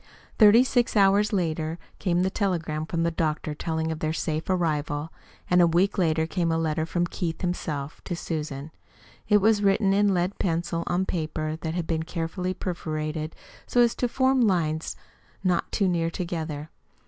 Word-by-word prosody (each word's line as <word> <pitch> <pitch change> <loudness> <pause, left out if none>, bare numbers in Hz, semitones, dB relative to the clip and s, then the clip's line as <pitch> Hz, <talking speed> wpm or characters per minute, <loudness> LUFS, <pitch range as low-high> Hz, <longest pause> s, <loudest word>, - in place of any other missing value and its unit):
Thirty 220 +2 +8
six 245 -3 +1
hours 200 +1 +4
later 165 -4 -1 0.2
came 180 -1 +1
the 190 - 0
telegram 165 -6 -1
from 165 0 -1
the 170 - +1
doctor 155 -2 -1
telling 160 +1 -2
of 160 - -4
their 155 0 -1
safe 155 0 -2
arrival, 155 -3 -1 0.3
and 180 0 +4
a 170 - +6
week 180 +5 +2
later 160 -2 +2
came 170 0 -1
a 165 - +1
letter 160 0 0
from 175 +1 0
Keith 170 -1 -4
himself 150 -5 -3
to 175 - -3
Susan. 150 -3 -4 0.6
It 210 -1 +5
was 215 0 +4
written 195 0 +3
in 205 0 +3
lead 180 +1 0
pencil 170 -1 -1
on 180 +2 +1
paper 155 -2 -2
that 160 0 -4
had 175 -2 -1
been 160 -1 -1
carefully 175 +3 -3
perforated 155 -3 -3 0.3
so 245 - +3
as 235 -1 +4
to 245 - -1
form 260 +1 +2
lines 165 -7 +1 0.5
not 180 -2 +1
too 200 - +1
near 170 -2 +1
together. 160 -4 -4
170 Hz, 170 wpm, -26 LUFS, 160-190 Hz, 0.6 s, Thirty